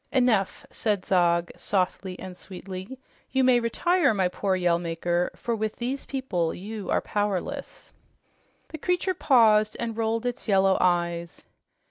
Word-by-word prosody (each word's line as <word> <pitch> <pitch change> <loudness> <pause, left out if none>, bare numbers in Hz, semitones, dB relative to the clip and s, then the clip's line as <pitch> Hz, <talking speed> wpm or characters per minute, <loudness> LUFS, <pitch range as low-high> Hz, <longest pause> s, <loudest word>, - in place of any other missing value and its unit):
"Enough!" 245 -7 +1
said 205 -4 -1
Zog, 170 -2 +2
softly 185 -1 -1
and 185 -1 -8
sweetly. 190 +5 -8 0.3
"You 265 0 +2
may 255 -1 +5
retire, 345 +5 +2
my 190 -2 +2
poor 190 +1 -1
Yell 175 -2 +2
Maker, 175 +1 -1
for 235 - -2
with 220 0 -2
these 255 +3 -4
people 185 -12 -1
you 210 +2 -7
are - - +2
powerless." 205 -3 -3 0.8
The 315 - -7
creature 360 +3 0
paused 220 -9 +4
and 230 -1 -3
rolled 225 +1 -1
its 245 -1 -3
yellow 195 -2 +4
eyes. 170 -1 0
205 Hz, 140 wpm, -26 LUFS, 180-235 Hz, 0.8 s, may